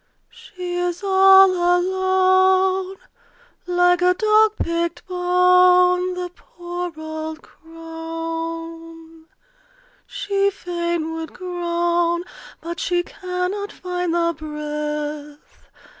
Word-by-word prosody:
She 365 -7 -7
is 355 +1 -2
all 385 0 +6
alone 375 +1 +2 0.7
Like 355 0 +3
a 360 0 +3
dog 430 +1 +3
picked 335 -2 -3
bone, 360 0 +3
The 360 -1 -5
poor 350 0 -7
old 315 0 -6
crone! 330 0 -8 0.8
She 400 0 0
fain 345 -4 -3
would 325 0 -6
groan, 345 -1 -1 0.4
But 340 +1 -6
she 350 -1 0
cannot 365 +3 -4
find 360 -2 -3
the 335 0 +1
breath. 300 -1 -6
355 Hz, 85 wpm, -21 LUFS, 330-365 Hz, 0.8 s, all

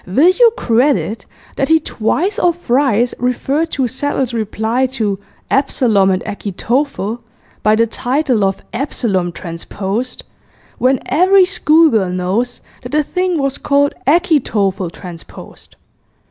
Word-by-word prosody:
Will 275 - +4
you 465 +5 +5
credit 240 - +1 0.3
that 275 - +1
he 320 0 +5
twice 340 - -1
or 350 -7 +3
thrice 250 -7 +1
referred 270 +6 -1
to 265 -3 0
Settle's 260 0 -2
reply 225 +3 -1
to 215 -7 -2 0.3
"Absalom 225 -8 +2
and 185 -1 0
Achitophel" 225 +3 -2 0.4
by 215 0 +3
the 230 +1 +3
title 250 0 0
of 195 0 -1
"Absalom 220 -8 -1
Transposed," 190 +8 -5 0.6
when 260 +1 +2
every 375 +3 +4
schoolgirl 310 - +3
knows 195 +7 -2 0.2
that 245 +3 -9
the 305 0 +3
thing 365 +3 -1
was 275 -2 -1
called 285 0 +2
"Achitophel 230 - +1
Transposed"! 170 -1 -12
250 Hz, 120 wpm, -16 LUFS, 210-295 Hz, 0.6 s, you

